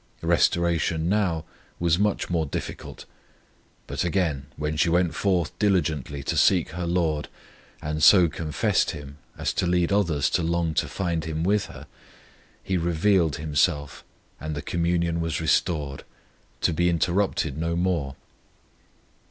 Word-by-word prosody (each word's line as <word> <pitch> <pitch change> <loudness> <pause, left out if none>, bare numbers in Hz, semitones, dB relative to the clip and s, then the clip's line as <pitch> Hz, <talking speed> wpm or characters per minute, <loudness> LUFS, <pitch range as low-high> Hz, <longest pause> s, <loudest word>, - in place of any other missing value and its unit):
Restoration 85 -1 +1
now 90 -6 0 0.3
was 85 0 +2
much 105 0 0
more 85 -3 -1
difficult; - - -6 0.8
but - - -3
again 85 -7 -1
when 75 +1 -2
she 85 - +2
went 85 0 +2
forth 90 -5 0
diligently 80 -9 0
to - - -2
seek 90 -4 +3
her 85 +1 -4
LORD, 85 -4 0 0.6
and 75 +1 -3
so 90 +1 +7
confessed 75 -1 0
Him 70 0 -11 0.2
as - - -1
to - - 0
lead 90 0 +1
others 80 -9 +1
to 90 - +1
long 85 -1 0
to - - 0
find 85 -4 -2
Him 80 0 -3
with 100 +3 +1
her, - - -11 0.8
He 95 - -1
revealed 85 -1 +2
Himself 75 -1 0 0.4
and 75 0 -4
the 75 - -5
communion 85 -1 0
was 80 -1 -2
restored, 80 -3 0 0.6
to 85 - +2
be 85 +2 +2
interrupted 85 -3 0
no 85 +2 -2
more. 85 -6 -1
85 Hz, 140 wpm, -25 LUFS, 75-90 Hz, 0.8 s, so